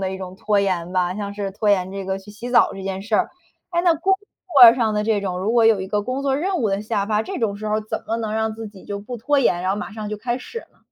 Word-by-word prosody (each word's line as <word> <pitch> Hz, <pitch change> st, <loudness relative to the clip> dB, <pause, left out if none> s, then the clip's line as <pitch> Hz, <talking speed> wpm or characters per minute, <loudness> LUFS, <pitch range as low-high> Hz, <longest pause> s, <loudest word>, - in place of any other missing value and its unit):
的 190 Hz, -1 st, -1 dB
一 190 Hz, -, -5 dB
种 185 Hz, -1 st, -8 dB
拖 210 Hz, -1 st, +1 dB
延 180 Hz, -3 st, -1 dB
吧， 180 Hz, -1 st, +1 dB
像 200 Hz, 0 st, -4 dB
是 200 Hz, -1 st, -4 dB
拖 205 Hz, +2 st, -2 dB
延 185 Hz, -2 st, +2 dB
这 195 Hz, 0 st, -5 dB
个 190 Hz, 0 st, -2 dB
去 195 Hz, +2 st, -13 dB
洗 230 Hz, +4 st, -7 dB
澡 245 Hz, -, +4 dB
这 195 Hz, -, -8 dB
件 190 Hz, 0 st, -4 dB
事 215 Hz, +2 st, -2 dB
儿。 -, -, +1 dB, 0.4 s
哎， 345 Hz, -1 st, +1 dB
那 345 Hz, -2 st, +4 dB
工 375 Hz, +5 st, +2 dB, 0.5 s
作 235 Hz, 0 st, +11 dB
上 225 Hz, -4 st, 0 dB
的 210 Hz, -, +1 dB
这 215 Hz, -2 st, +1 dB
种， 185 Hz, -2 st, -3 dB
如 200 Hz, +5 st, -1 dB
果 235 Hz, -2 st, +5 dB
有 220 Hz, -3 st, +4 dB
一 190 Hz, -, -4 dB
个 205 Hz, +2 st, -1 dB
工 255 Hz, +5 st, -3 dB
作 270 Hz, -1 st, +1 dB
任 370 Hz, +5 st, -1 dB
务 225 Hz, -8 st, +1 dB
的 195 Hz, +1 st, 0 dB
下 210 Hz, -2 st, -1 dB
发， 215 Hz, 0 st, +1 dB
这 -, -, -5 dB
种 210 Hz, -4 st, -1 dB
时 215 Hz, -, -6 dB
候 210 Hz, -, +1 dB
儿 -, -, -1 dB
怎 215 Hz, -, -5 dB
么 225 Hz, -, -1 dB
能 220 Hz, -2 st, -3 dB
让 220 Hz, 0 st, -1 dB
自 225 Hz, 0 st, -7 dB
己 200 Hz, -2 st, -15 dB
就 200 Hz, -, -4 dB
不 240 Hz, +4 st, -7 dB
拖 280 Hz, +6 st, +1 dB
延， 180 Hz, -9 st, +2 dB
然 185 Hz, -, 0 dB
后 195 Hz, -, 0 dB
马 210 Hz, -, -6 dB
上 215 Hz, -1 st, -6 dB
就 210 Hz, -, -3 dB
开 240 Hz, +3 st, -2 dB
始 465 Hz, -, -7 dB
呢？ -, -, -31 dB
210 Hz, 340 characters per minute, -22 LUFS, 195-230 Hz, 0.5 s, 作